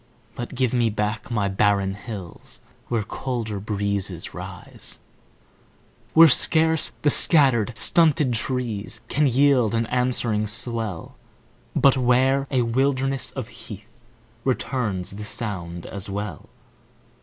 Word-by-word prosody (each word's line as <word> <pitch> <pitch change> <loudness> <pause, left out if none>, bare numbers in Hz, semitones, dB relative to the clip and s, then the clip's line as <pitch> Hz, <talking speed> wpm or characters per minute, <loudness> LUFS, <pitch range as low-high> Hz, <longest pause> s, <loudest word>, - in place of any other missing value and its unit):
But 120 +2 -7
give 130 -2 0
me 120 -2 +2
back 105 +2 -3
my 105 -4 0
barren 100 0 +1
hills 100 -4 -9 0.3
Where 115 -3 -1
colder 115 -2 -4
breezes 100 -3 -3
rise; 90 -1 -4 1.2
Where 165 +1 +9
scarce 160 +2 +3
the 145 - +5
scattered, 125 - +4
stunted 155 -6 +4
trees 115 -3 -3
Can 150 0 +2
yield 130 -3 +3
an 115 0 +1
answering 120 -3 0
swell, 110 -4 -4 0.6
But 135 -1 +4
where 130 +2 +2
a 130 -3 +1
wilderness 135 +2 0
of 130 -4 -6
heath 115 -1 -12 0.5
Returns 120 -8 -2
the 105 - -6
sound 90 -6 -5
as 100 0 -4
well. 100 -5 -6
115 Hz, 115 wpm, -23 LUFS, 100-130 Hz, 1.2 s, Where